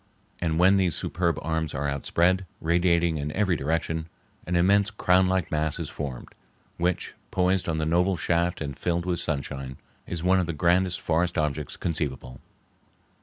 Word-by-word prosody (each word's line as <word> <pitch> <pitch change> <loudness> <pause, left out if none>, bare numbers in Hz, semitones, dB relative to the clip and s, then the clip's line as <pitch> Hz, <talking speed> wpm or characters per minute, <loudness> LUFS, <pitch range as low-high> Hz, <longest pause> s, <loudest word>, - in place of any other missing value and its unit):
And 80 -2 0
when 95 +3 +5
these 90 -4 +1
superb 85 -1 -1
arms 80 -1 -2
are 70 +1 -1
outspread, 85 +7 +1
radiating 85 0 +2
in 75 0 -3
every 95 -3 +1
direction, 80 +2 -1 0.4
an 90 - 0
immense 100 +4 +4
crownlike 95 -3 +2
mass 75 -1 0
is - - -4
formed 70 -5 -6 0.5
which, 90 +1 -1 0.2
poised 90 -1 +1
on 80 - 0
the 80 - 0
noble 90 +3 +2
shaft 85 +1 0
and 70 -3 -4
filled 85 +3 -1
with 90 -2 -1
sunshine, 70 -3 -4 0.3
is 85 -1 -4
one 95 +1 +4
of 90 - 0
the 85 - -2
grandest 90 +3 +2
forest 85 +2 0
objects 75 -2 -2
conceivable. 70 -5 -3
85 Hz, 160 wpm, -26 LUFS, 75-90 Hz, 0.5 s, when